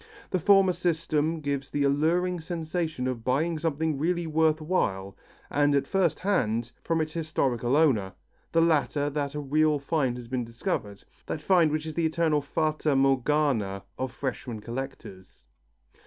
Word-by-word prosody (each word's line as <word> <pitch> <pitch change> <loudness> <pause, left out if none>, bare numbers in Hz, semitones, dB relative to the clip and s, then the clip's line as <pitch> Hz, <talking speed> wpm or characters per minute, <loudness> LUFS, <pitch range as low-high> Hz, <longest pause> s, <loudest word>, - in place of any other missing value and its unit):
The 185 - +1
former 195 +1 +5
system 165 -2 0
gives 140 -2 -3
the 145 - 0
alluring 165 +6 +1
sensation 160 -4 -3
of 125 -3 -3
buying 155 +6 0
something 160 -2 -1
really 175 +2 0
worth 160 0 +2
while, 100 - -1 0.4
and 145 0 +3
at 140 -1 +2
first 185 -1 +1
hand, 120 - 0
from 165 -1 0
its 155 0 -3
historical 135 -6 0
owner; 120 -12 +3 0.4
the 165 - +3
latter 145 -2 +1
that 145 0 -3
a - - -2
real 150 +2 +2
find 140 -3 -1
has 120 -1 -9
been 125 0 -2
discovered, 110 -3 -4 0.2
that - - -3
find 175 -5 +4
which 155 0 -2
is 160 - -5
the 165 0 +1
eternal 160 -2 +1
fata 155 0 0
Morgana 135 -7 +1 0.2
of 130 -1 -2
freshman 125 -3 -4
collectors. 115 - -8
150 Hz, 155 wpm, -27 LUFS, 130-160 Hz, 0.4 s, former